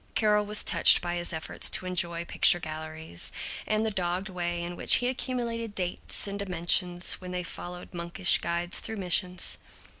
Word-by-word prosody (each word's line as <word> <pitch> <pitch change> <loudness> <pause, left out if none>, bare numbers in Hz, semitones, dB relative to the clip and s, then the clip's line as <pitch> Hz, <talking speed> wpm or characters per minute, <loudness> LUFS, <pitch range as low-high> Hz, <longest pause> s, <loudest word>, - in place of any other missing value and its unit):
Carol 210 -1 +1
was 210 0 +3
touched - - +5
by 175 -1 -4
his 175 0 -3
efforts 160 -1 -2
to - - +2
enjoy 170 -2 -2
picture 175 - +4
galleries, 155 - -6 0.4
and 215 +1 0
the 220 - -1
dogged 185 0 -3
way 175 -2 -3
in 175 0 -5
which - - +6
he 245 - 0
accumulated 235 -4 -4
dates 180 -2 -2
and 200 0 -5
dimensions 180 -1 +2
when 180 - -8
they 180 0 -4
followed 175 +1 -8
monkish 175 +1 +3
guides 170 +1 0
through 220 0 -5
missions. 180 -1 -1
180 Hz, 170 wpm, -27 LUFS, 175-200 Hz, 0.4 s, which